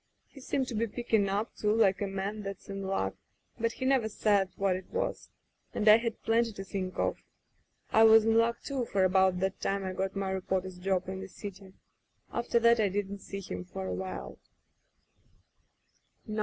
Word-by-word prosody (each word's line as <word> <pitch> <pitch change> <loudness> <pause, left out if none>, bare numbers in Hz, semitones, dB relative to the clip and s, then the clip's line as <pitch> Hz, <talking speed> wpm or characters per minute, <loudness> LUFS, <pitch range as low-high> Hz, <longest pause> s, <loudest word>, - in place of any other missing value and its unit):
He 275 - -14
seemed 265 0 -1
to - - -4
be 230 +1 0
picking 220 -3 0
up, 205 +4 -2
too, 210 - 0
like 205 -4 +3
a 200 - 0
man 195 +2 -3
that's 195 0 -7
in 195 0 -4
luck, 95 - -1 0.5
but 230 0 0
he 260 - -4
never 260 -5 +3
said 205 -3 +2
what 195 -2 +1
it 185 0 -7
was, - - -2 0.5
and 215 - -1
I 215 +1 +10
had 230 -1 -4
plenty 230 +1 +2
to 195 - -6
think 190 -1 -4
of. - - -1 0.7
I 220 - +5
was 220 0 +7
in 225 0 +3
luck, 230 +1 +2
too, 270 -4 -2
for 195 -3 +1
about 185 -1 +3
that 190 0 -1
time 195 0 -1
I 185 - -3
got 190 +1 -2
my 195 -1 -1
reporter's 185 -1 -2
job 185 -1 0
in 190 0 -4
the 195 - -6
city. 195 -1 -9 0.6
After 235 0 0
that 235 0 +5
I 210 -2 +3
didn't 200 +1 -3
see 195 0 -7
him 90 - -6
for 95 +1 -6
awhile. 90 -9 -5
195 Hz, 190 wpm, -30 LUFS, 190-225 Hz, 0.7 s, I